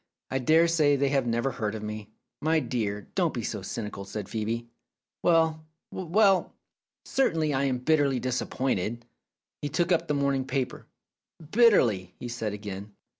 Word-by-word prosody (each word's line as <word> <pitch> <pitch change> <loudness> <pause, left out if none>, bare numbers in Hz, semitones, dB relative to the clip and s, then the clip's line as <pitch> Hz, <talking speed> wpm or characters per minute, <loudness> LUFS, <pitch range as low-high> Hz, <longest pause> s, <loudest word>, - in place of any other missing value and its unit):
"I 135 - +1
dare 160 +6 +5
say 155 -4 +3
they 140 0 +1
have 135 -3 +1
never 120 +3 0
heard 110 -4 -3
of 110 - -6
me." 105 0 -6 0.3
"My 160 +1 +3
dear, 105 -8 -3
don't - - +1
be - - -3
so - - -3
cynical," 105 -3 -5
said 100 +1 -5
Phcebe. 115 +3 -3 0.6
"Well, 160 -2 +3 0.3
well! 190 +2 +2 0.5
Certainly 160 - +1
I 135 +1 +1
am 130 -2 +1
bitterly 140 -1 +2
disap 130 0 -2
pointed." 120 -2 -1 0.6
He 145 - -2
took 170 +4 0
up 170 -1 +2
the 150 - 0
morning 140 -2 +1
paper. 130 -1 -3 0.6
"Bitterly!" 120 - +4
he 125 - -6
said 115 -3 -3
again. 100 0 -7
130 Hz, 160 wpm, -27 LUFS, 110-155 Hz, 0.6 s, dare